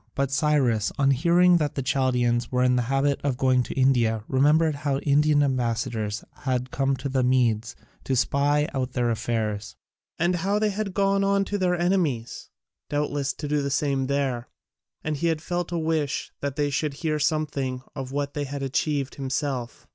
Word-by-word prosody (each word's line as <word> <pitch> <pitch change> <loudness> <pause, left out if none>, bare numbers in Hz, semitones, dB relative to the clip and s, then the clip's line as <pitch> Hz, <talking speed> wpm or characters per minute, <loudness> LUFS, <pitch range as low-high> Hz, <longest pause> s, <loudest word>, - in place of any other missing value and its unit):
But 140 -1 0
Cyrus, 135 -7 +2
on 140 0 +3
hearing 175 +6 +4
that 150 -3 -1
the 135 - -2
Chaldaeans 125 -2 +1
were 125 0 +2
in 125 0 +3
the 125 - +2
habit 135 +1 +1
of 140 -3 0
going 130 -1 +3
to 125 - -4
India, 120 -5 +2
remembered 150 +4 +3
how 140 -1 -1
Indian 145 +1 +3
ambassadors 115 -5 -1
had 130 -1 -2
come 135 0 +1
to 130 +2 -4
the 135 -1 0
Medes 120 -3 +1 0.3
to 135 - 0
spy 145 +4 +2
out 130 -2 -2
their 120 -1 +1
affairs, 110 -2 -2 0.4
and 175 +2 +1
how 195 +5 0
they 210 0 +1
had 200 -1 -4
gone 195 0 +2
on 200 0 +2
to 205 +1 -3
their 180 -1 +2
enemies 170 -10 -1 0.4
doubtless 145 -1 -1
to 150 - -6
do 150 0 +1
the 140 - -2
same 140 -2 0
there 135 -3 -1 0.6
and 155 -1 -2
he 170 +3 +1
felt 175 +2 -4
a 170 - -1
wish 160 -3 -1
that 140 -1 -3
they 145 -1 0
should 145 0 -1
hear 155 -1 -1
something 145 -4 -1
of 135 -2 -5
what 145 +1 -3
he 145 -1 -2
had 140 0 -5
achieved 140 +1 -1
himself. 135 -3 -3
140 Hz, 180 wpm, -25 LUFS, 125-150 Hz, 0.6 s, hearing